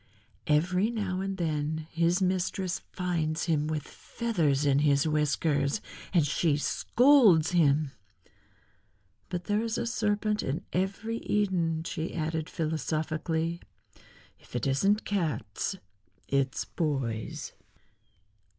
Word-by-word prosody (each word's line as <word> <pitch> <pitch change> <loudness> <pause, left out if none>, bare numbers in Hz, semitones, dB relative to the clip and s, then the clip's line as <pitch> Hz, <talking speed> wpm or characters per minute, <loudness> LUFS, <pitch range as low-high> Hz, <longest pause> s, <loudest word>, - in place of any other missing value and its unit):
"Every 180 +7 +2
now 200 -5 -2
and 195 0 -3
then 155 -2 -1
his 170 +3 +2
mistress 185 0 0
finds 165 -3 -1
him 155 -3 +1
with 155 -2 -2
feathers 160 - -1
in 140 -1 +4
his 145 +1 +3
whiskers, 150 0 +1 0.3
and 170 -5 +4
she 150 +1 +1
scolds 225 - +4
him. 150 -4 +3 1.4
But 180 -1 -3
there 205 +4 +1
is 230 0 -2
a - - -1
serpent 215 -2 0
in 135 +4 -3
every 200 +5 -1
Eden," 180 -8 0
she 165 0 -4
added 160 0 -2
philosophically; 160 +1 -2 0.8
"if - - -15
it 120 - -1
isn't 195 +11 +2
cats 170 - -2 0.5
it's 135 -1 0
boys." 135 -9 -3
165 Hz, 110 wpm, -29 LUFS, 150-190 Hz, 1.4 s, in